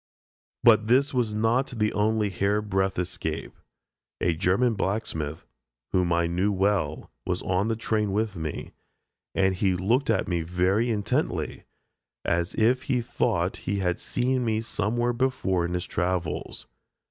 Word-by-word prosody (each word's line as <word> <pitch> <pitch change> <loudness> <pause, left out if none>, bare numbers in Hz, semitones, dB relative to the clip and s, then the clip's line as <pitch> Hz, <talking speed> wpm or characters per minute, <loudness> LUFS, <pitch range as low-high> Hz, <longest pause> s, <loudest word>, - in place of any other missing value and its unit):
But 110 -2 +6
this 135 +5 +3
was 115 -4 0
not 115 +5 +2
the 105 -1 +1
only 105 0 +1
hair 100 +3 +1
breadth 95 -2 0
escape. 90 -3 -3 0.7
A 85 - +2
German 95 +9 +2
blacksmith, 90 -7 -3 0.5
whom 90 -2 +2
I 85 0 +3
knew 90 +5 +1
well, 95 -6 0
was - - -2
on 95 +3 +1
the 115 - 0
train 110 -2 0
with 105 0 -1
me, 80 -3 -5 0.6
and 95 -1 +3 0.2
looked 120 +9 +1
at - - +2
me 85 -2 0
very 90 +7 +1
intently, 105 -3 -1 0.6
as 85 +4 0
if 120 +4 +3
he 125 -2 +2
thought 120 - 0
he 100 - +1
had 90 -2 0
seen 125 +1 0
me 110 -2 0
somewhere 120 +2 -1
before 120 -8 0
in 85 +1 -2
his 90 - -2
travels. 85 -1 -2
100 Hz, 145 wpm, -26 LUFS, 90-115 Hz, 0.7 s, But